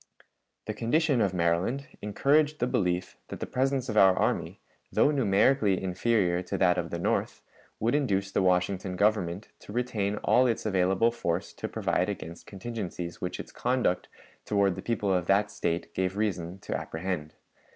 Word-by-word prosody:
The 110 - -3
condition 130 +4 +1
of 100 - +2
Maryland 90 +10 0 0.2
encouraged 145 +8 +2
the 125 - 0
belief 90 -8 -1
that - - -7
the - - -3
presence 130 0 0
of 110 - -3
our 95 -2 +7
army, - - -1 0.3
though 145 - +4
numerically 105 -4 +3
inferior 95 -1 +1
to 90 - -4
that 90 -1 +3
of 85 -1 -3
the - - -3
North, - - -1 0.4
would 115 +4 +1
induce 100 -9 +1
the - - +1
Washington 90 0 +1
Government 100 -1 0
to - - -12
retain 105 -4 -1
all 125 +1 +4
its 115 -2 -1
available 95 +3 +2
force 90 -7 -2
to - - -5
provide - - 0
against 85 +1 -7
contingencies 95 -4 -6
which 90 - -3
its - - -7
conduct 120 -7 0 0.4
toward 100 -2 +2
the - - -7
people 105 -4 0
of 90 -2 0
that 105 +2 +3
State 85 0 -2
gave 95 +1 -1
reason 95 -4 -2
to - - -4
apprehend. 80 -2 -4
100 Hz, 165 wpm, -28 LUFS, 90-115 Hz, 0.4 s, our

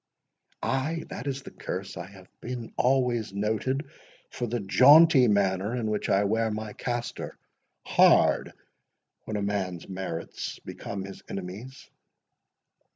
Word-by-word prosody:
"Ay, 155 +5 -1
that - - -6
is 135 -1 -3
the - - -10
curse! - - -5
I 85 - -6
have 95 -2 -15
been 120 -2 -6
always 125 -5 +1
noted 110 +8 -1 0.4
for 120 - -3
the 120 +2 -2
jaunty 135 +6 +7
manner 100 +1 +1
in 110 -3 -1
which 105 - -2
I 100 +1 +4
wear 110 +2 +1
my 110 0 -4
castor—Hard 120 +1 +1 0.7
when 110 - -3
a 100 - -2
man's 95 -4 -2
merits 95 -3 -5
become 95 -1 -6
his 95 - -10
enemies!" 100 +8 -7
110 Hz, 125 wpm, -27 LUFS, 100-125 Hz, 0.7 s, jaunty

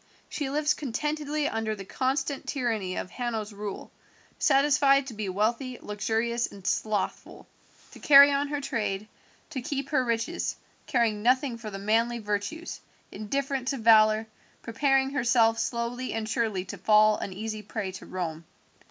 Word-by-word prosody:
She 290 -3 -3
lives 300 +2 +1
contentedly 300 +2 -2
under 225 -3 -2
the 195 -2 -9
constant 270 +5 -2
tyranny 225 -9 -2
of 185 - -5
Hanno's 225 -4 -3
rule, 205 -1 -6 0.5
satisfied 275 0 +4
to 260 - -7
be 210 -2 -4
wealthy, 235 +6 -1
luxurious, 225 +3 -1
and 195 -2 -13
slothful, 210 0 -2 0.5
to - - -13
carry 280 0 +8
on 280 +1 +1
her 290 0 -2
trade, 215 -7 -3 0.4
to 265 -4 -4
keep 275 +2 -4
her 275 -4 +2
riches, 235 +7 -1 0.3
caring 225 -4 +1
nothing 255 +2 +2
for 230 -2 -7
the 195 - -6
manly 225 +4 +1
virtues, 210 +10 -4 0.3
indifferent 265 +5 -3
to 275 - 0
valour, 220 -1 +5 0.4
preparing 270 +3 +1
herself 235 -4 +3
slowly 240 +2 -2
and 225 -1 -3
surely 220 -5 -1
to 195 0 -8
fall 215 +2 +5
an - - -5
easy 215 +2 -5
prey 205 -2 -4
to 190 - -10
Rome. 165 -3 -4
230 Hz, 150 wpm, -27 LUFS, 210-270 Hz, 0.5 s, carry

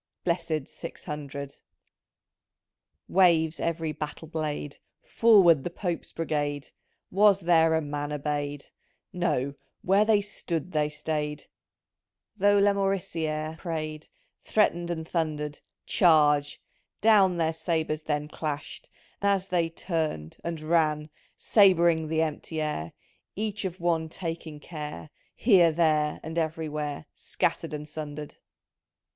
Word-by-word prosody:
Blessid 170 -4 -1
Six 165 - -9
Hundred! 140 -3 -6 1.5
Waves 170 -4 +3
every 165 -1 -1
battle 155 +2 -6
blade, 150 -2 -4
— - - -53
" - - -52
Forward 190 -10 +5
the - - -2
Pope's 175 -1 -4
Brigade! 145 -3 -2 0.2
'.' - - -48
Was 200 0 +5
there 165 -2 +4
a 160 - +1
man 145 0 -4
obeyed? 145 -1 -3 0.5
No 140 -6 0
— - - -49
where 195 +3 +4
they 215 -1 +4
stood 185 -4 -4
they 150 -1 +1
stayed, 150 -1 -3 0.9
Though 205 +1 +4
Laraorici^re 170 -6 0
pray'd, 155 -3 -4 0.4
Threatened 175 -5 +1
and 160 -2 -4
thundered 150 -3 -2
— - - -60
" - - -60
Charge! 150 -4 +4 0.2
" - - -51
Down 200 -5 +5
their 165 -1 +1
sabres 160 -2 -1
then 150 -1 -2
Clashed, 150 -1 -5 0.3
as 200 -1 +1
they 170 -2 +1
turn'd 160 - -3
— - - -28
and 170 -1 -3
ran 155 -1 +1
— - - -37
Sab'ring 170 -6 +4
the 160 +1 +1
empty 160 +1 -4
air, 115 - -3 0.4
Each 210 -1 -2
of 185 -1 -4
one 165 -2 0
taking 165 -3 -6
care, 150 - -7 0.2
Here, 185 -8 +5
there, 155 -2 +2
and 160 +2 -3
everywhere 155 -2 -3
Scattered - - -2
and 150 0 -5
sundered. 150 -1 -7
160 Hz, 130 wpm, -27 LUFS, 150-175 Hz, 1.5 s, Forward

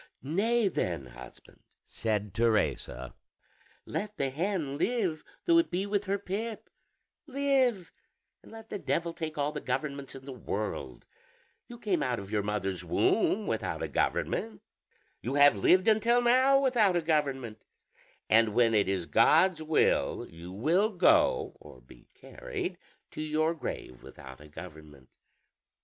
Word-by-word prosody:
"Nay 210 - +1
then, 85 - -2
husband," 60 0 -14 0.2
said 105 -3 -3
Teresa, 110 - 0 0.7
"let 210 0 -4
the 135 -1 -1
hen 155 -3 -2
live, 190 -11 0 0.2
though 335 -1 +5
it 335 - +1
be 185 +2 -1
with 205 0 -1
her 200 +1 0
pip; 210 +3 -5 0.6
live, 265 - +1 0.5
and - - -16
let 225 0 -11
the 205 - -3
devil 170 -2 -1
take 160 -1 -5
all 145 +1 0
the 150 -1 -6
governments 140 +1 -4
in 135 0 -11
the 140 - -7
world: 100 - -5 0.6
you 240 - -10
came 205 -6 -1
out 125 -2 0
of 100 -1 -8
your 105 -1 +1
mother's 100 -2 -3
womb - - +1
without - - -2
a - - -1
government, - - -1 0.6
you 130 +5 -3
have 145 -3 +6
lived 185 - +3
until 230 +2 +4
now 260 +3 +4
without 240 -8 +3
a 175 - +2
government, 135 -8 -1 0.7
and 110 -1 +4
when 120 -2 +4
it 100 -3 +2
is 95 -3 -1
God's 160 - +4
will 155 0 +1
you 85 +2 -10
will 165 - +2
go, 185 -6 +3
or 65 - -14
be - - -18
carried, - - -6 0.3
to - - -6
your 155 +1 0
grave 65 - -7
without 65 0 -12
a 75 - -13
government. 75 -4 -12
150 Hz, 145 wpm, -29 LUFS, -, 0.7 s, have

